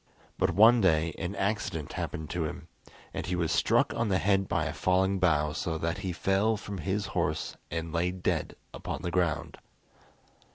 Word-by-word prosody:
But -, -, +3 dB
one 115 Hz, +4 st, +7 dB
day 80 Hz, -3 st, +3 dB
an 90 Hz, +4 st, -3 dB
accident 100 Hz, -7 st, -2 dB
happened 80 Hz, -1 st, -4 dB
to 90 Hz, -2 st, -1 dB
him, 75 Hz, -, -6 dB, 0.5 s
and -, -, -3 dB
he 90 Hz, -, 0 dB
was 85 Hz, -2 st, 0 dB
struck -, -, +3 dB
on 115 Hz, -2 st, -1 dB
the 95 Hz, -, +3 dB
head 95 Hz, 0 st, +2 dB
by -, -, 0 dB
a -, -, -3 dB
falling 95 Hz, +1 st, +2 dB
bough, 75 Hz, -4 st, +2 dB
so 85 Hz, -3 st, -2 dB
that 85 Hz, +1 st, -2 dB
he 95 Hz, -, -3 dB
fell 95 Hz, +5 st, +1 dB
from 100 Hz, -2 st, -6 dB
his 95 Hz, +4 st, -1 dB
horse 80 Hz, -4 st, -1 dB
and 80 Hz, 0 st, -4 dB
lay 85 Hz, +2 st, +1 dB
dead 90 Hz, 0 st, -2 dB, 0.2 s
upon -, -, -5 dB
the 85 Hz, -, -2 dB
ground. 85 Hz, -5 st, -1 dB
90 Hz, 180 wpm, -29 LUFS, 80-100 Hz, 0.5 s, one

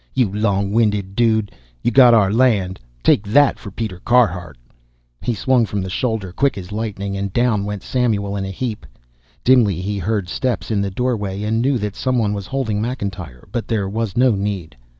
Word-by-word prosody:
"You 120 Hz, -7 st, +1 dB
long 100 Hz, -2 st, 0 dB
winded 105 Hz, -3 st, +1 dB
dude. 110 Hz, -3 st, +2 dB, 0.3 s
You -, -, +2 dB
got 125 Hz, -1 st, +7 dB
our 100 Hz, -3 st, +3 dB
land 105 Hz, -7 st, +2 dB, 0.2 s
take -, -, +4 dB
that 145 Hz, +7 st, +4 dB
for 105 Hz, -, -8 dB
Peter 100 Hz, -2 st, -5 dB
Carhart!" 90 Hz, -, +1 dB, 0.6 s
He 120 Hz, -, -1 dB
swung 125 Hz, +3 st, +2 dB
from 100 Hz, -2 st, -2 dB
the 95 Hz, -, -5 dB
shoulder 110 Hz, -3 st, -2 dB
quick 135 Hz, +4 st, +1 dB
as 95 Hz, 0 st, -8 dB
lightning 100 Hz, -2 st, -3 dB
and 100 Hz, 0 st, -3 dB
down 110 Hz, -2 st, +1 dB
went 105 Hz, -1 st, -5 dB
Samuel 105 Hz, -6 st, 0 dB
in 100 Hz, -, -2 dB
a 95 Hz, -, -4 dB
heap. 110 Hz, +3 st, -4 dB, 0.6 s
Dimly 115 Hz, -9 st, +4 dB
he 100 Hz, +2 st, -3 dB
heard 100 Hz, 0 st, -1 dB
steps 105 Hz, -1 st, -2 dB
in 105 Hz, -2 st, +1 dB
the 100 Hz, -, -1 dB
doorway 105 Hz, -2 st, -2 dB
and 110 Hz, +2 st, 0 dB
knew 135 Hz, +1 st, +2 dB
that 105 Hz, -2 st, -4 dB
some 130 Hz, -1 st, 0 dB
one 105 Hz, -3 st, +1 dB
was 100 Hz, -2 st, -5 dB
holding 115 Hz, -6 st, -1 dB
McIntyre, 95 Hz, -, -5 dB
but 115 Hz, +1 st, -3 dB
there 105 Hz, -4 st, 0 dB
was 110 Hz, 0 st, -3 dB
no 125 Hz, 0 st, +5 dB
need. 100 Hz, -, -3 dB
105 Hz, 190 wpm, -20 LUFS, 95-120 Hz, 0.6 s, got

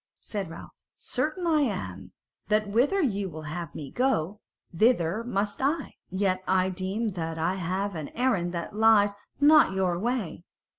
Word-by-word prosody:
Said 200 Hz, -5 st, -4 dB
Ralph: 165 Hz, -, -10 dB, 0.3 s
"Certain 365 Hz, -2 st, -2 dB
I 315 Hz, -3 st, +3 dB
am 95 Hz, -, -3 dB, 0.4 s
that 215 Hz, 0 st, +2 dB
whither 265 Hz, -, +2 dB
ye 200 Hz, -7 st, 0 dB
will 155 Hz, -3 st, -8 dB
have 160 Hz, +1 st, -6 dB
me 140 Hz, -3 st, -7 dB
go, 210 Hz, -7 st, 0 dB, 0.4 s
thither 215 Hz, -1 st, +2 dB
must 205 Hz, -2 st, -2 dB
I; 290 Hz, +5 st, 0 dB, 0.2 s
yet 185 Hz, 0 st, 0 dB
I 185 Hz, 0 st, +3 dB
deem 190 Hz, +5 st, -2 dB
that 165 Hz, -4 st, -4 dB
I 165 Hz, +3 st, +1 dB
have 190 Hz, +2 st, -2 dB
an 155 Hz, -4 st, -5 dB
errand 230 Hz, -9 st, +1 dB
that 170 Hz, +4 st, -5 dB
lies 215 Hz, -2 st, +5 dB, 0.3 s
not 295 Hz, -7 st, +6 dB
your 185 Hz, -2 st, 0 dB
way. 220 Hz, -7 st, -2 dB
195 Hz, 155 wpm, -27 LUFS, 175-230 Hz, 0.4 s, not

